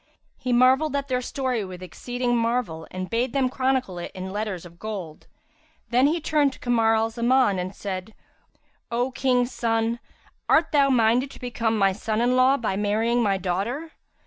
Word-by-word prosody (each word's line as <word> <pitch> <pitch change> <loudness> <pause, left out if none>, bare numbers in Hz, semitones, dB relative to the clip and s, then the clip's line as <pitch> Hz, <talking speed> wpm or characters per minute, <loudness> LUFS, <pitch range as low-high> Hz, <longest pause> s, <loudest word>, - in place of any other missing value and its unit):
He 255 - -2
marvelled 260 +4 +4
at 280 0 -2
their 250 -1 0
story 255 -3 -2
with 185 -1 -8
exceeding 245 +6 -2
marvel 230 -9 -1
and 185 0 -5
bade 235 +4 -1
them 270 -2 +2
chronicle 260 -8 0
it 175 - -6
in 190 0 -5
letters 205 -4 -4
of 170 0 -14
gold. 195 -8 -7 0.6
Then 250 +3 +4
he 325 +4 +1
turned 295 -3 +1
to - - -15
Kamar 225 -2 +2
al 225 +1 +1
Zaman 235 -3 +2
and 185 +2 -4
said, 190 +1 -6 0.7
"O 245 +2 -1
King's 250 -1 +1
son, 230 0 0 0.5
art 320 +1 +4
thou 280 -2 +4
minded 245 +1 +3
to - - -13
become 230 -2 -1
my 195 -2 +4
son 215 +3 -2
in 245 +2 +2
law 260 +2 +4
by 220 -6 -2
marrying 220 +4 +1
my 200 -4 +2
daughter?" 200 - -3
235 Hz, 175 wpm, -24 LUFS, 205-255 Hz, 0.7 s, marvelled